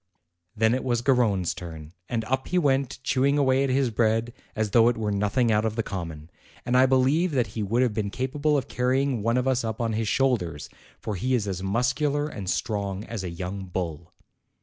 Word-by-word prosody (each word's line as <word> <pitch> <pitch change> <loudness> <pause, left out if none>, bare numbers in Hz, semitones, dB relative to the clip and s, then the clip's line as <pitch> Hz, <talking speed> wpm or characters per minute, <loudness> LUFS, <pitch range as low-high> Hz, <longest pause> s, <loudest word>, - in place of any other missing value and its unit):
Then 110 +1 +3
it 130 - -1
was 120 -2 0
Garrone's 110 -10 +2
turn, 80 -2 -9 0.2
and 115 -2 -1
up 130 +2 -1
he 180 - 0
went, 140 -5 +1
chew 130 -1 +1
ing 140 +1 +3
away 135 -1 +3
at 135 - 0
his 130 -1 +1
bread 115 +1 +1 0.2
as 110 -2 -1
though 115 +2 +6
it 120 - +2
were 105 -2 -1
nothing 105 +4 +1
out 105 0 +2
of 110 -1 -1
the 115 - 0
common; 85 -5 -6 0.3
and 125 - 0
I 130 +1 +6
believe 135 +7 +2
that 125 -4 +2
he 110 - -3
would 115 +5 +1
have 120 -4 +1
been 105 -1 -2
capable 145 +6 0
of 135 -1 -2
carrying 130 -1 0
one 115 +3 +1
of 125 +1 0
us 130 -1 +1
up 110 -1 -3
on 115 -2 -1
his 110 0 -1
shoulders, 105 - 0 0.3
for 110 - -4
he 125 +7 0
is 110 -4 -1
as 95 -2 -3
muscular 130 +8 0
and 100 -11 -6
strong 100 -2 -2
as 110 -4 -5
a 90 - -3
young 95 +3 -5
bull. 85 -3 -5
115 Hz, 215 wpm, -26 LUFS, 100-130 Hz, 0.3 s, though